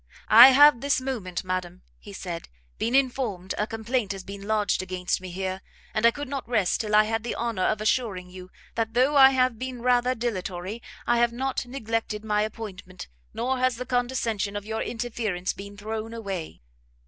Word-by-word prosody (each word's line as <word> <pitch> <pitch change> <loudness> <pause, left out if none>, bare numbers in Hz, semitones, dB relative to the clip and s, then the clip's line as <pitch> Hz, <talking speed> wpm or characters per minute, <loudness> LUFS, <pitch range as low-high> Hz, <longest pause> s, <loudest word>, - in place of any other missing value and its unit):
"I 235 +4 +12
have 280 -2 +7
this 280 -1 +2
moment, 225 -10 -4
madam," 185 -1 -4 0.2
he 205 - -12
said, 175 -3 -6 0.3
"been 235 +3 0
informed 245 -9 0
a 210 - 0
complaint 225 -1 -2
has 195 -1 -8
been 200 +1 -8
lodged 215 -3 +1
against 185 -1 -2
me 185 - -7
here, 190 +1 -4 0.3
and 215 +2 +4
I - - +8
could 290 +4 -5
not 270 -3 -5
rest 205 -7 +1
till 210 -1 0
I 215 - +7
had 225 0 -2
the 240 - -3
honour 230 -5 -2
of 215 +3 +1
assuring 210 -5 -1
you, 185 0 -10 0.2
that 225 0 -2
though 260 +4 +3
I 265 -1 +9
have 255 -3 +1
been 255 -2 -5
rather 250 0 +3
dilatory, 200 -2 -4 0.2
I 240 0 +2
have 235 0 +3
not 260 +1 -3
neglected 225 -4 -3
my 210 -1 +1
appointment, 205 - -6 0.2
nor 255 +3 -1
has 255 -1 +2
the 250 +2 -5
condescension 240 -5 -1
of 205 0 -4
your 220 +1 -3
interference 220 -6 -3
been 200 +1 -10
thrown 220 +2 -5
away." 195 - -6
220 Hz, 185 wpm, -26 LUFS, 195-245 Hz, 0.3 s, I